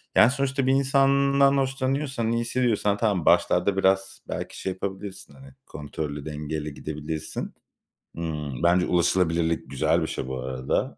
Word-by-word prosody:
yani, 110 +3 +7
sonuçta 135 0 -1
bir - - +4
insandan 140 0 +3
hoşlanıyorsan, 135 -2 -1
iyi 115 0 +1
hissediyorsan, 115 -4 +1
tamam, 100 -6 0
başlarda 100 -1 +3
biraz 95 0 +1
belki - - -5
şey 95 - -2
yapabilirsin, 95 +1 -6
hani, 135 0 -14
kontrollü, 75 -1 -6
dengeli 75 0 -4
gidebilirsin. 75 +1 -5 0.6
Iıı, 75 -4 -3
bence 90 +1 +4
ulaşılabilirlik 85 -2 +1
güzel 70 - +2
bir - - -1
şey - - -4
bu 65 0 -4
arada, 65 0 -2
95 Hz, 135 wpm, -25 LUFS, 80-130 Hz, 0.6 s, yani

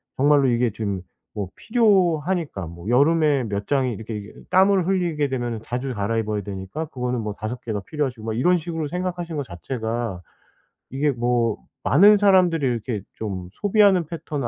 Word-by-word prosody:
정말로 145 0 +4
이게 120 -1 +2
지금 100 -3 -3 0.3
뭐 100 -2 -3
필요하니까 180 - +1
뭐 85 +3 -10
여름에 145 +1 +3
몇 100 -1 -3
장이 135 -3 +1
이렇게 110 +1 -6
이게 105 0 -9 0.2
땀을 190 0 +4
흘리게 170 -6 0
되면은 120 -4 -3
자주 125 +3 -3
갈아입어야 105 0 -1
되니까 95 +10 -5
그거는 125 -5 -3
뭐 105 -1 -4
5 110 +4 -5
개가 110 -3 -3
필요하시고 135 -8 -3
막 110 - -2
이런 180 +8 +4
식으로 165 -2 -4
생각하신 175 -1 -4
거 145 - -1
자체가 115 0 -4 0.7
이게 145 +3 +1
뭐 120 -2 0 0.3
많은 200 - +6
사람들이 185 -6 +4
이렇게 115 -3 -2
좀 95 -5 -5
소비하는 200 -4 +3
패턴은 150 -4 -4
130 Hz, 365 characters per minute, -23 LUFS, 110-165 Hz, 0.7 s, 많은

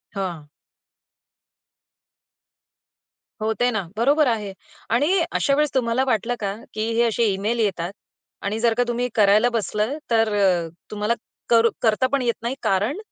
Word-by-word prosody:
हां. 175 -6 -4 2.9
होते 220 +3 +1
ना. 200 -6 -3
बरोबर 285 +5 +3
आहे 210 -4 -1 0.4
आणि 330 +9 +3
अशावेळेस 290 +1 +1
तुम्हाला 245 +1 +1
वाटलं 240 +1 0
का? 200 -1 -2 0.2
की 220 +1 -2
हे 235 - +4
असे 230 0 +1
ईमेल 215 +5 -1
येतात 185 -4 -1 0.5
आणि 210 +3 -2
जर 230 -1 +3
का 245 - +4
तुम्ही 240 +1 -1
करायला 215 +3 +5
बसलं, 215 +5 -1
तर 225 -2 +3
अ, 180 -5 +2 0.2
तुम्हाला 210 +2 0 0.4
करू 230 0 +5
करता 225 +3 +2
पण 280 -2 +1
येत 235 -2 +1
नाही, 240 +3 -2
कारण 205 - +1
225 Hz, 135 wpm, -22 LUFS, 205-245 Hz, 2.9 s, करायला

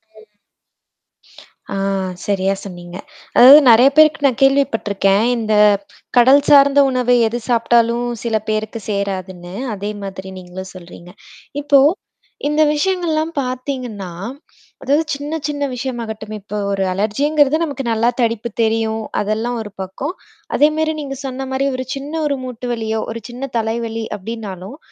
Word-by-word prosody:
ம். 215 - -15 1.6
ஆ - - -2 0.5
சரியா 195 -1 +1
சொன்னீங்க. 175 -1 -9 0.4
அதாவது 270 +5 +10
நெறைய 240 +4 +7
பேருக்கு 310 -1 +5
நான் 260 0 -2
கேள்விப்பட்ருக்கேன். 225 -7 +2
இந்த 220 -1 -1 0.6
கடல் 265 +4 +6
சார்ந்த 280 0 +6
உணவு 250 -1 +2
எது 240 +2 -3
சாப்டாலும் 235 0 +2 0.2
சில 230 -2 -1
பேருக்கு 215 +1 -2
சேராதுன்னு. 185 -3 -4 0.2
அதே 205 +2 -4
மாதிரி 190 -1 -7
நீங்களும் 185 +1 -9
சொல்றீங்க. 175 0 -12 0.5
இப்போ 285 -1 +4 0.7
இந்த 300 +1 +1
விஷயங்கள்லாம் 330 -2 0
பாத்தீங்கன்னா, 250 -6 -5 0.7
அதாவது 290 +4 +2
சின்ன 290 +3 -4
சின்ன 290 -1 -3
விஷயமாகட்டும். 230 -4 -5
இப்ப 210 +1 -7
ஒரு 195 -1 0
அலர்ஜிங்கறது 280 +9 +2
நமக்கு 280 -4 -4
நல்லா 230 +2 +2
தடிப்பு 230 0 -1
தெரியும், 220 0 0 0.2
அதெல்லாம் 220 +3 -2
ஒரு 210 -1 -8
பக்கம். 225 - -5 0.4
அதேமாரி 310 +1 +2
நீங்க 275 -2 -6
சொன்ன 265 0 -5
மாரி 265 +1 0
ஒரு 255 0 -4
சின்ன 280 +3 -7
ஒரு 280 - -1
மூட்டு 250 -1 -6
வலியோ 220 -1 -2
ஒரு 230 0 -6
சின்ன 255 +3 -6
தலைவலி 225 0 -2
அப்டினாலும், 205 +2 -7
235 Hz, 130 wpm, -18 LUFS, 210-275 Hz, 1.6 s, அதாவது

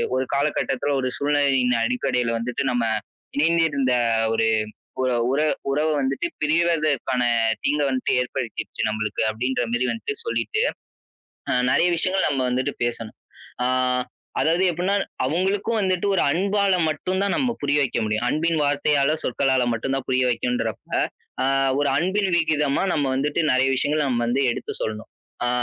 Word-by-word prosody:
ஒரு 130 - +1
காலகட்டத்தில 140 -1 0
ஒரு 130 - -1
சூழ்நிலையின் 140 -3 +2
அடிப்படையில 125 -1 0
வந்துட்டு, 125 +4 -2
நம்ம 120 -1 0 0.5
இணைந்திருந்த 150 -5 +2 0.4
ஒரு 115 0 +2 0.6
உற 130 - +1 0.2
உற 150 +3 +1 0.3
உறவு 155 +3 +1
வந்துட்டு 135 - -1
பிரிவதற்கான 155 -5 +1 0.4
தீங்க 150 +1 +1
வந்துட்டு 130 -1 -1
ஏற்படுத்திடுச்சு 125 -2 -4
நம்பளுக்கு." 110 -1 -2
அப்படின்ற 125 +3 -1
மாரி 125 +1 +1
வந்துட்டு 420 - -4
சொல்லிட்டு, 435 -1 -1 0.9
அ - - +2 0.2
நெறைய 175 +6 +3
விஷயங்கள் 190 +3 +1
நம்ம 135 -2 0
வந்துட்டு 130 +1 -1
பேசணும். 115 -2 -5 0.5
ஆ - - +3 0.7
அதாவது 170 +4 +2
எப்புட்னா, 180 +4 0 0.3
அவங்களுக்கும் 195 - 0
வந்துட்டு 185 +1 0
ஒரு - - +2
அன்பால 200 +2 +1 0.2
மட்டும் 185 +5 -2
தான் 200 - 0
நம்ம 255 -4 +1
புரிய 145 0 +1
வைக்க 130 - -1
முடியும். 110 +2 -1
அன்பின் 160 +4 +1
வார்த்தையால, 145 0 +2
சொற்களால 130 0 +1
மட்டும் 135 +4 -2
தான் 135 - -3
புரிய 130 0 +2
வைக்கணும்ன்றப்ப, 115 -1 -2 0.5
அ - - +2 0.3
ஒரு 145 - +2
அன்பின் 190 +4 +1
விகிதமா 150 -3 +1
நம்ம 145 - +1
வந்துட்டு 145 +2 -1
நெறைய 130 +1 +3
விஷயங்கள் 150 +3 0
நம்ம 120 -1 0
வந்து 125 +3 +1
எடுத்து - - -5
சொல்லணும். 110 0 -4 0.4
ஆ - - +1
140 Hz, 145 wpm, -23 LUFS, 125-165 Hz, 0.9 s, நெறைய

